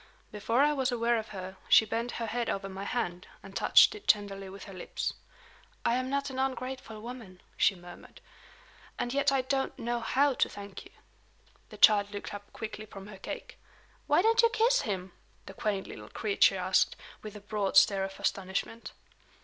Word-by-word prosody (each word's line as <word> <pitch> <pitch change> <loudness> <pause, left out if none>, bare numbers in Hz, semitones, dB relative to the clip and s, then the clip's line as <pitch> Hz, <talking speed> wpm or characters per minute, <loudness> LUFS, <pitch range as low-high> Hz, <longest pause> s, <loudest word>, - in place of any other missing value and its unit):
Before 225 +4 +1
I 300 +1 +3
was 265 -3 0
aware 235 -1 +1
of 220 - -7
her, 190 -1 -8
she 220 - +7
bent 230 +2 -3
her 230 - -3
head 235 +1 -2
over 195 0 -2
my 195 +1 -6
hand, 180 -7 -3 0.2
and 195 0 -12
touched - - +6
it 420 -1 -12
tenderly 195 -2 +1
with 195 +1 -10
her 195 - -10
lips. 185 - -4 0.7
"I - - +3
am 255 +1 -1
not 280 0 -1
an 260 - -5
ungrateful 260 -4 -3
woman," 225 -5 -9 0.2
she 195 - +3
murmured 175 0 -13 0.8
"and 245 - -2
yet 280 0 +3
I 270 -1 +2
don't 270 +1 -1
know 240 +1 -2
how 275 +4 +2
to - - +1
thank 200 -1 -9
you." - - -15 0.8
The - - -11
child 205 -2 +6
looked 205 - -6
up 205 0 -9
quickly 215 -1 -7
from 195 -2 -10
her 195 -2 -11
cake. - - -7 0.5
"Why - - +4
don't 455 +1 +5
you 465 - +5
kiss 460 +3 +3
him?" 190 -3 -4 0.3
the 195 - -9
quaint 200 -1 -2
little - - -10
creature 400 -2 +2
asked, - - +2 0.3
with 215 -1 -9
a - - -7
broad 205 -1 -1
stare 195 0 +6
of 195 0 -6
astonishment. 195 +4 -3
215 Hz, 190 wpm, -30 LUFS, 195-255 Hz, 0.8 s, she